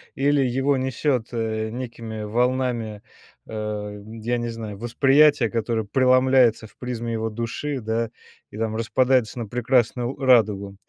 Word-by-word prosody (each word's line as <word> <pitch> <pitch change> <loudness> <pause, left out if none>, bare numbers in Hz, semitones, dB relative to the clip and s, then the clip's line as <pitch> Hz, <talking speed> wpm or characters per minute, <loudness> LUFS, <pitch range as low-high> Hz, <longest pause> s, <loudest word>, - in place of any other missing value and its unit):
или 145 +1 +2
его 135 +2 +1
несет, 130 -2 -1
э, 110 -2 -2
некими 115 -2 -6
волнами, 120 -1 -1 0.5
э, - - -10
м, 105 -1 -5
я 120 +2 -1
не 120 0 -3
знаю, 110 -3 -6
восприятия, 135 +2 +4
которое 115 -1 -1
преломляется 130 -1 +3
в 105 - -25
призме 120 -2 -4
его 110 0 -2
души, 120 +6 -4
да, 115 0 -2 0.4
и - - -11
там 110 0 -2
распадается 125 +1 +1
на 115 - -4
прекрасную 125 +1 +1
радугу. 105 -7 +3
115 Hz, 140 wpm, -23 LUFS, 110-130 Hz, 0.5 s, восприятия